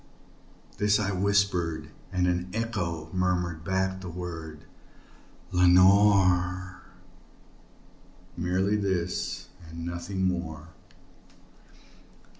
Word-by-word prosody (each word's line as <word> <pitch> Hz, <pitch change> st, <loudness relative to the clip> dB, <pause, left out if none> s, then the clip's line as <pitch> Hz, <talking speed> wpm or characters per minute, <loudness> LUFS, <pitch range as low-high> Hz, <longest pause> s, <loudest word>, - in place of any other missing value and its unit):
This 105 Hz, 0 st, +3 dB
I 100 Hz, -2 st, 0 dB
whispered, 95 Hz, -4 st, 0 dB, 0.2 s
and 90 Hz, -1 st, +1 dB
an 90 Hz, 0 st, -1 dB
echo 85 Hz, -9 st, -3 dB
murmured 90 Hz, -3 st, -1 dB
back 95 Hz, +1 st, -1 dB
the 90 Hz, -, -7 dB
word, 80 Hz, -3 st, -7 dB, 0.9 s
"Lenore!" 95 Hz, 0 st, +4 dB, 1.5 s
Merely 95 Hz, +4 st, 0 dB
this 95 Hz, -3 st, -2 dB, 0.2 s
and 85 Hz, +1 st, -7 dB
nothing 85 Hz, +2 st, -3 dB
more. 85 Hz, -3 st, -3 dB
90 Hz, 75 wpm, -27 LUFS, 85-95 Hz, 1.5 s, Lenore